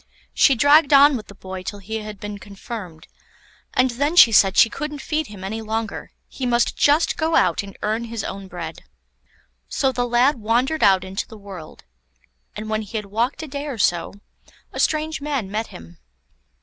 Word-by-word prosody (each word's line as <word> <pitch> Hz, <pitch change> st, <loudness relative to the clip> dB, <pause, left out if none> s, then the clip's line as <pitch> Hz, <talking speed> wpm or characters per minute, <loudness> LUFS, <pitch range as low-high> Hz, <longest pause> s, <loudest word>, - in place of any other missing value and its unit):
She 270 Hz, -, +4 dB
dragged 285 Hz, +4 st, +5 dB
on 280 Hz, +1 st, +7 dB
with 220 Hz, -4 st, -6 dB
the 200 Hz, -, -13 dB
boy 190 Hz, -1 st, -8 dB
till 205 Hz, +2 st, -6 dB
he 210 Hz, +3 st, -5 dB
had 210 Hz, -2 st, -8 dB
been 205 Hz, 0 st, -7 dB
confirmed, 200 Hz, -5 st, -9 dB, 0.7 s
and 255 Hz, 0 st, +3 dB
then 285 Hz, +7 st, -1 dB
she 240 Hz, -9 st, +8 dB
said 195 Hz, -2 st, +4 dB
she -, -, +7 dB
couldn't 300 Hz, +5 st, -5 dB
feed 305 Hz, +2 st, -2 dB
him 200 Hz, -3 st, -11 dB
any 220 Hz, +4 st, -4 dB
longer, 220 Hz, 0 st, -4 dB, 0.2 s
he 255 Hz, -, -5 dB
must 240 Hz, 0 st, +1 dB
just 295 Hz, +3 st, +3 dB
go 320 Hz, 0 st, 0 dB
out 170 Hz, -, +3 dB
and 200 Hz, -1 st, -11 dB
earn 220 Hz, +2 st, -1 dB
his 230 Hz, -2 st, -5 dB
own 195 Hz, 0 st, -6 dB
bread. 170 Hz, -3 st, -7 dB, 0.9 s
So 270 Hz, -, +1 dB
the 245 Hz, -1 st, -1 dB
lad 245 Hz, +3 st, +3 dB
wandered 245 Hz, +8 st, 0 dB
out 190 Hz, -2 st, +4 dB
into 190 Hz, +2 st, -5 dB
the 220 Hz, -, -12 dB
world, 195 Hz, -6 st, -11 dB, 0.7 s
and 215 Hz, +1 st, -6 dB
when 215 Hz, 0 st, -1 dB
he 220 Hz, +1 st, -6 dB
had 210 Hz, -, -4 dB
walked 230 Hz, +9 st, -2 dB
a -, -, -6 dB
day 285 Hz, +1 st, -5 dB
or 270 Hz, -5 st, -5 dB
so, 175 Hz, -2 st, 0 dB, 0.6 s
a -, -, -6 dB
strange 310 Hz, -1 st, 0 dB
man 275 Hz, -9 st, -3 dB
met 220 Hz, +2 st, -2 dB
him. 85 Hz, 0 st, -13 dB
225 Hz, 190 wpm, -22 LUFS, 200-275 Hz, 0.9 s, she